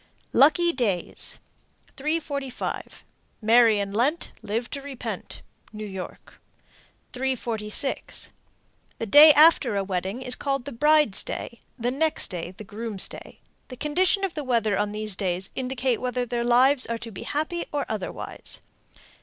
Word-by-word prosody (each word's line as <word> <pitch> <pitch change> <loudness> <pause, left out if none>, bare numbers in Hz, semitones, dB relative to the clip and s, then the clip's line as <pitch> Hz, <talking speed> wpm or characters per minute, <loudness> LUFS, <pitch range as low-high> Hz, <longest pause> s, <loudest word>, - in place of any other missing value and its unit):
LUCKY 340 +5 +5
DAYS. 205 -9 -2 0.6
345. 285 -3 -4 0.3
Marry 225 0 +5
in 200 -1 -2
Lent, 270 +10 0
Live 230 +4 -2
to 280 - -4
repent. 275 -2 -7 0.3
New 215 0 -6
York. 190 -3 -9 0.7
346. 245 -2 -1 0.7
The - - -3
day 295 +8 +9
after 305 -7 +6
a 200 - +1
wedding 195 +5 -3
is 250 - +3
called 275 -1 -1
the 285 - -6
bride's 300 -3 +3
day, 235 - -6 0.2
the 245 0 -1
next 310 +4 0
day 175 -2 -4
the - - -8
groom's 215 -1 -3
day; - - -12 0.3
the 255 - -9
condition 370 - +1
of 380 -3 -1
the 300 - -4
weather 230 -5 +1
on 205 +1 0
these 215 -1 -2
days 185 -1 -2
will - - -7
indicate 255 -1 -1
whether 250 0 -1
their 240 0 -2
lives 255 +3 +4
are 230 - -2
to 230 0 -8
be 190 - -8
happy 315 +4 -2
or 290 -1 -1
otherwise. 215 -4 -5
245 Hz, 145 wpm, -25 LUFS, 210-285 Hz, 0.7 s, day